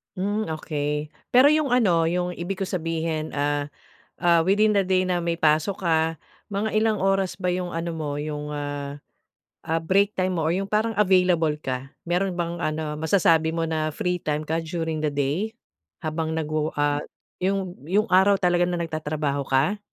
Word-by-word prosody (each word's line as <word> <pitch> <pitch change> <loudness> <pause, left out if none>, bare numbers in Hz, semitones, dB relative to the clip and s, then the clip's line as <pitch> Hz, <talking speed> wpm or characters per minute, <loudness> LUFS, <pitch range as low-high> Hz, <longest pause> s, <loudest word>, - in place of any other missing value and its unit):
Hmm, 205 +3 -1 0.2
okey. 150 -1 -2 0.2
Pero 255 +3 +7
'yong 300 -3 +3
ano 185 -10 +4
'yong 180 +1 -1
ibig 180 +3 -4
ko 195 - -1
sabihin, 165 -3 -2
ah, 145 0 -1 0.5
ah, 170 -1 +5
within 205 +5 +3
the 205 - +3
day 185 0 +3
na 180 -1 0
may 170 -1 -1
pasok 160 +4 +1
ka, 160 -1 +2 0.3
mga 210 +1 -2
ilang 215 -3 +1
oras 195 -2 +1
ba 180 -1 -1
'yong 180 -1 -3
ano 170 +1 -2
mo 155 -3 -3
'yong, 150 0 -4
ah, 145 -1 -5 0.6
ah, 165 +1 0
break 195 +5 +2
time 185 -2 -1
mo 160 - 0
or 160 - +2
yong 195 +3 -1
parang 215 +2 +1
available 180 -6 +3
ka? 130 0 -3 0.2
Mayro'n 180 +2 0
bang 170 -1 -3
ano 155 -1 -2
masasabi 160 -1 +3
mo 165 - 0
na 155 -2 -1
free 180 0 -1
time 150 -1 -2
ka 160 +2 -1
during 160 -1 -3
the 155 - 0
day, 145 +10 -1 0.5
habang 160 0 -2
nagwowo 155 -1 -2
ah 145 0 +1 0.4
'yong 185 -6 -2
'yong 210 +4 +1
araw 190 +2 +6
talaga 175 -2 +2
na 175 - -1
nagtatrabaho 155 -4 -2
ka? 155 +10 +2
165 Hz, 175 wpm, -24 LUFS, 155-185 Hz, 0.6 s, Pero